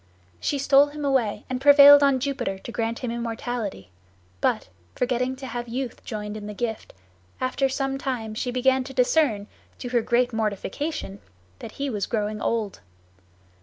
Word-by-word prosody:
She 285 - -1
stole 280 +1 +5
him 295 0 -6
away, 260 -7 0
and 255 0 -3
prevailed 285 0 +9
on 275 -2 +4
Jupiter 255 -7 -2
to 215 - -9
grant 230 0 -2
him 245 -3 -4
immortality; 230 - -4 0.5
but, - - +1 0.3
forgetting 250 +1 0
to 265 +1 -9
have 240 -1 -5
youth 245 +1 -5
joined 210 -1 -5
in 210 -1 -7
the 210 - -7
gift, 225 0 -4 0.4
after 260 +1 0
some 270 0 -2
time 240 -6 -3
she 235 +3 -3
began 260 +1 +2
to 270 0 -9
discern, 250 -5 +2 0.3
to 245 - -6
her 240 -1 +2
great 245 +1 +1
mortification, 220 +2 -3 0.4
that 220 - -9
he 280 - -3
was 210 -7 -2
growing 215 -2 -2
old. 220 -4 -1
245 Hz, 165 wpm, -25 LUFS, 220-270 Hz, 0.5 s, prevailed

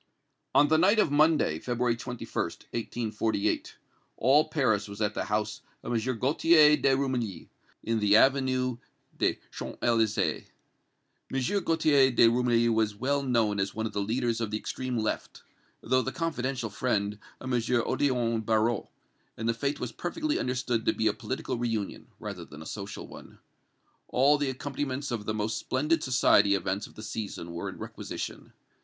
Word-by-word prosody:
On 145 - +6
the 155 +1 +3
night 195 +6 +4
of 210 - +3
Monday, 150 - +3
February 120 +1 0
21st, 120 +1 -4 0.5
1848, 110 -2 -1 0.4
all 140 +6 +4
Paris 110 -9 +1
was 100 0 -9
at 105 -1 0
the - - -2
house 105 0 -2 0.2
of - - -3
M. 120 +2 -1
Gaultier 150 +4 +5
de 135 -2 +2
Rumilly, 125 -10 -2 0.3
in 115 0 0
the 105 -1 +4
Avenue 130 0 +3 0.4
des - - +1 0.2
Champs - - -7
Elysées. 110 -3 +1 0.9
M. 135 +10 0
Gaultier 155 -5 +4
de 120 -2 +5
Rumilly 120 0 +3
was 110 -2 +1
well 140 +6 0
known 115 -6 +1
as 95 0 -1
one 110 +1 -2
of 110 - -4
the 100 - -1
leaders 115 +2 -1
of 110 - -1
the 105 - -1
extreme 120 +3 -4
left, 110 -1 -3 0.4
though 130 +2 +2
the 135 - -3
confidential 135 -6 -2
friend 105 -2 -1 0.2
of 130 -1 -4
M. 120 - +3
Odillon 120 -1 +1
Barrot, 110 0 +1 0.5
and 115 - -3
the 115 - +3
fête 140 +5 -2
was 125 - -4
perfectly 305 - -2
understood 125 -2 -1
to - - +4
be 110 - -2
a - - +3
political 130 -1 -4
reunion, 115 -4 -3
rather - - -6
than 75 +1 -11
a - - -14
social 100 +2 -6
one. - - -13 0.7
All 140 +3 +4
the 145 -2 0
accompaniments 140 +1 -4
of 110 -3 -4
the 110 - -1
most 110 +1 -1
splendid 150 +5 0
society 105 -6 +4
events 95 +2 -2
of - - -19
the 110 - -9
season 105 -5 -5
were 85 0 -4
in - - -9
requisition. - - -7
120 Hz, 165 wpm, -28 LUFS, 110-135 Hz, 0.9 s, On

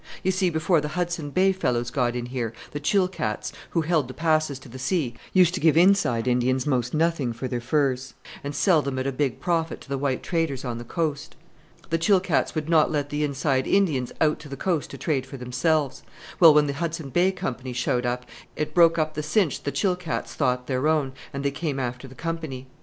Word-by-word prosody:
You 190 - +2
see, 185 -1 +1
before 160 0 +2
the 150 - -3
Hudson 170 -4 -2
Bay 185 +6 +3
fellows 120 -10 -1
got 125 -2 0
in 120 -1 -3
here, 120 -2 -3 0.2
the 145 - -4
Chilkats, 180 - 0 0.2
who 165 - +1
held 155 -4 +1
the 130 - -9
passes 155 -3 +1
to 135 - -14
the 130 +2 -10
sea, 135 -3 0 0.2
used 180 -2 +5
to 185 - -2
give 160 -1 +4
inside 170 - +4
Indians 125 +1 +1
most 125 -2 0
nothing 155 -6 +1
for 130 +3 -4
their 125 -2 -3
furs, 130 -1 0 0.3
and 140 0 -4
sell 165 0 +4
them 140 -2 -3
at 130 - -2
a 135 - 0
big 135 -1 -1
profit 165 -2 -1
to - - -15
the 140 -1 -2
white 135 -2 -1
traders 160 -7 -1
on 120 -2 -3
the - - -6
coast. 150 +3 -3 0.6
The 165 - +2
Chilkats 190 0 +2
would 155 -1 -2
not 160 -2 +4
let 145 -2 -2
the 150 +1 -1
inside 135 -2 0
Indians 155 -11 +2
out 155 -1 +2
to 150 -1 -11
the 140 - -6
coast 170 0 -1
to - - -8
trade 135 -5 -1
for 135 - -8
themselves. 130 +3 0 0.4
Well, 165 -3 +9
when 150 0 +5
the 140 - -2
Hudson 160 -2 -4
Bay 180 +7 +3
Company 130 -9 -4
showed 125 0 0
up, 125 0 -2 0.3
it 150 - -3
broke 170 -1 +5
up 155 -1 0
the 155 - -3
cinch 155 +1 +1
the 140 - -2
Chilkats 180 +2 -1
thought 125 -3 0
their 130 +3 0
own, 150 -4 +1 0.2
and 140 -1 -5
they 140 - +2
came 140 -1 -3
after 125 +1 -4
the 130 - -13
Company. 160 -6 -4
145 Hz, 220 wpm, -25 LUFS, 130-165 Hz, 0.6 s, Well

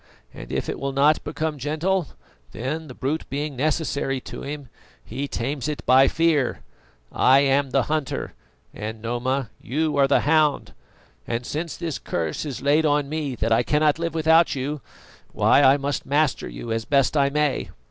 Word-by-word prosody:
And - - -10
if - - -2
it - - -4
will 135 0 -3
not 145 +3 +3
become 155 0 -3
gentle, 160 +5 0 0.5
then, 150 +7 -4
the 130 - -10
brute 150 +5 -3
being 145 +1 -3
necessary 140 -1 -1
to - - -8
him, 145 -1 -6 0.4
he 140 +1 -4
tames 135 +3 -3
it 150 -1 -4
by 130 +2 +6
fear. 160 -6 +1 0.5
I 135 +2 +5
am 140 0 +2
the 130 0 +2
hunter 155 -1 -3 0.4
and, 110 +1 -6
Noma, 120 +2 -2
you 150 +3 -1
are 140 -1 +5
the 140 - +3
hound; 150 -1 +2 0.5
and 115 +1 -3
since 160 +4 -4
this 165 -4 -4
curse 80 - -3
is 135 -2 -6
on 145 0 +2
me 150 -4 -3
that 115 0 -2
I 115 +1 +4
cannot 150 +3 +2
live 170 -1 -3
without 160 0 +4
you, 140 +2 -3 0.5
why - - +4
I 135 0 +6
must 140 -1 -2
master 145 - 0
you - - -7
as 115 0 -1
best 140 +4 +2
I 140 -2 +3
may. 150 -1 0
140 Hz, 170 wpm, -23 LUFS, 130-155 Hz, 0.5 s, by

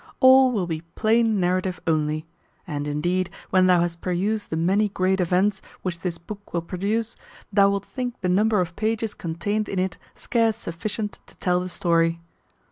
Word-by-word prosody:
All 260 0 +7
will 205 -7 0
be 160 -2 -3
plain 225 -1 +3
narrative 185 0 0
only; 155 -1 0 0.4
and, 145 -3 -4
indeed, 175 +5 0 0.2
when 185 -1 +5
thou 180 -2 +5
hast 170 -1 -2
perused 200 +4 -1
the - - -2
many 195 +6 +2
great 190 0 +1
events 185 +3 +2 0.2
which 175 -2 -3
this 170 -1 -3
book 205 +4 -10
will 170 - 0
produce, 205 +6 -2 0.4
thou 200 -1 +6
wilt 200 0 -1
think 250 -2 -5
the 185 - 0
number 210 +3 +3
of 170 -1 -4
pages 220 0 -1
contained 200 +6 -2
in 195 - -3
it 185 0 -1 0.2
scarce 225 -2 +1
sufficient 210 +2 -4
to - - -16
tell 180 -1 +1
the 180 0 -4
story. 165 -1 +1
185 Hz, 175 wpm, -24 LUFS, 170-215 Hz, 0.4 s, All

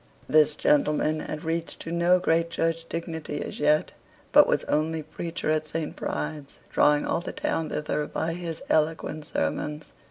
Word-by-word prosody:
This 155 -1 +5
gentleman 150 +1 +2
had 155 0 -5
reached 165 +1 -3
to 165 - -6
no 170 +1 +4
great 165 -1 +1
church 165 0 -1
dignity 160 -3 -4
as - - -7
yet, 150 +1 +3 0.4
but - - +8
was - - +1
only 155 +1 0
preacher 160 +1 -3
at 155 0 0
St. 155 0 -3
Bride's, 150 -3 -4
drawing 150 0 +4
all 170 - 0
the - - -5
town 165 -1 -2
thither 150 0 -2
by 165 +1 -2
his 165 -2 -5
eloquent 155 -1 0
sermons. 150 +1 -3
155 Hz, 160 wpm, -26 LUFS, 150-165 Hz, 0.4 s, but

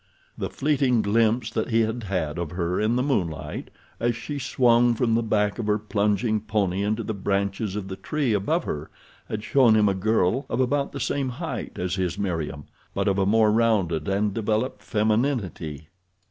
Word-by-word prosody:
The - - -3
fleeting 135 -5 +1
glimpse 110 +2 +2
that - - -2
he 115 -1 +3
had 110 +2 -1
had 85 -5 -2
of 85 -3 -3
her 90 0 -1
in 110 +2 +2
the 125 - +1
moonlight 90 - -2 0.3
as 120 0 +1
she 145 +4 -5
swung 120 -2 +3
from 115 -1 +1
the 115 - +3
back 105 -1 0
of 110 - -2
her 105 0 +3
plunging 105 +1 0
pony 100 -3 0
into 110 +3 0
the 110 - -3
branches 100 +1 -1
of 105 -2 -4
the 95 - -5
tree 145 0 -1
above 155 - +1
her 75 0 -4 0.4
had 105 -1 -4
shown 120 -3 +4
him 105 -1 +4
a 100 - +3
girl 110 +5 +1
of 115 - -1
about 140 +2 +1
the - - -6
same 140 -2 -1
height 125 - -5
as 90 0 -2
his 90 -1 -1
Meriem; 80 -7 -3 0.3
but - - 0
of 100 0 +2
a 95 - +2
more 110 0 +4
rounded 105 -9 +1
and 100 +1 +1
developed 110 +3 -1
femininity. 105 - -1
105 Hz, 190 wpm, -25 LUFS, 95-120 Hz, 0.4 s, shown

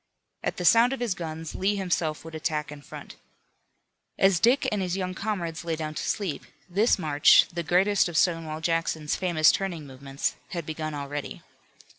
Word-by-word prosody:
At - - -2
the 180 - -3
sound 235 +6 +6
of 270 - -4
his 240 -5 0
guns 160 -2 -6
Lee 200 +2 0
himself 170 -5 -2
would 165 - -9
attack 155 -1 -2
in 145 -1 -10
front. - - -11 1.0
As 195 -3 +4
Dick 245 +8 +3
and 210 -2 -1
his 185 0 -2
young 185 -1 -3
comrades 180 -6 -3
lay 165 -1 -2
down 155 -1 -4
to - - -4
sleep 190 -8 -3 0.2
this 205 +6 +2
march, 150 -5 +5
the 170 - -2
greatest 185 +4 +2
of 165 - -3
Stonewall 160 -1 0
Jackson's 165 -2 -1
famous 170 -4 +4
turning 175 -6 -3
movements, 135 0 -4 0.2
had 170 -3 -4
begun 155 -1 -4
already. 145 0 -6
165 Hz, 175 wpm, -26 LUFS, 155-190 Hz, 1.0 s, sound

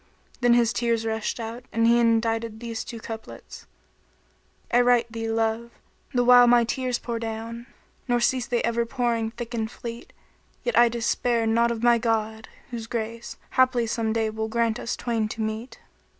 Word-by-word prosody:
*" - - -30
Then 240 -1 +5
his 235 -1 +3
tears 230 -1 0
rushed 220 +1 -2
out, 230 +2 -6
and 230 0 +2
he 235 +1 +5
indited 225 -1 +1
these 230 -1 -5
two 230 - -8
couplets, 225 0 -9 1.1
"I 245 - +6
write 245 -1 +3
thee, 225 0 -4
love, 225 +1 0 0.4
the 245 -1 +2
while 245 0 +7
my 240 0 +6
tears 250 +1 -1
pour 235 -1 -4
down; 230 +1 -6 0.2
* - - -37
Nor 245 -1 +2
cease 245 +1 +1
they 240 -1 0
ever 235 0 +1
pouring 235 -2 -1
thick 240 +1 -8
and 220 -2 -2
fleet: 235 0 -8 0.5
Yet - - -1
I 240 0 +6
despair 235 0 0
not 230 +1 +3
of 235 -1 -3
my 240 -1 +5
God, 220 -1 -1 0.2
whose 230 -2 -5
grace 230 0 -5
* - - -34
Haply 255 -2 +4
some 225 0 -1
day 220 -1 0
will 220 0 -3
grant 230 0 0
us 235 - -3
twain 230 -3 -1
to 220 +1 -6
meet." 220 +3 -5
230 Hz, 185 wpm, -25 LUFS, 225-240 Hz, 1.1 s, while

